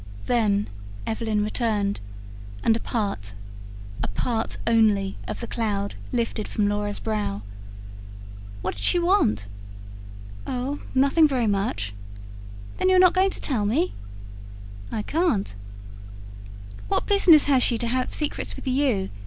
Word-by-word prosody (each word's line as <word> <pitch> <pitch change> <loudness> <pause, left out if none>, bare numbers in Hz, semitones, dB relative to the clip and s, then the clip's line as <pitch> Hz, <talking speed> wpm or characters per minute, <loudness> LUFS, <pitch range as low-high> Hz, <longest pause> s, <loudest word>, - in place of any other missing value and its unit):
Then 210 -4 +2 0.4
Evelyn 220 -2 -1
returned, 210 -2 0 0.6
and 225 - +4
a - - -1
part, 200 - -3 0.7
a - - -1
part 225 - -2
only 215 -4 +3
of - - -5
the - - -3
cloud 210 -4 -2 0.2
lifted 230 -2 -1
from 210 -1 0
Laura's 205 0 -1
brow. 210 - -3 1.2
"What - - -1
did 100 - -8
she - - +4
want?" 345 - +2 1.0
"Oh, 260 +3 -3 0.2
nothing 280 +4 +5 0.2
much." 105 - -2 0.9
"Then 370 - +3
you're 375 - +5
not 365 -1 +6
going 380 +1 +3
to - - -6
tell 245 -8 0
me?" 310 - +1 1.0
I 215 - -2
can't. 295 - 0 1.3
"What - - 0
business 365 -7 +6
has 275 -3 +4
she 235 - +4
to 235 - -2
have 255 +2 0
secrets 300 -2 -2
with - - -10
you?" 255 -7 +1
225 Hz, 130 wpm, -24 LUFS, 205-280 Hz, 1.3 s, not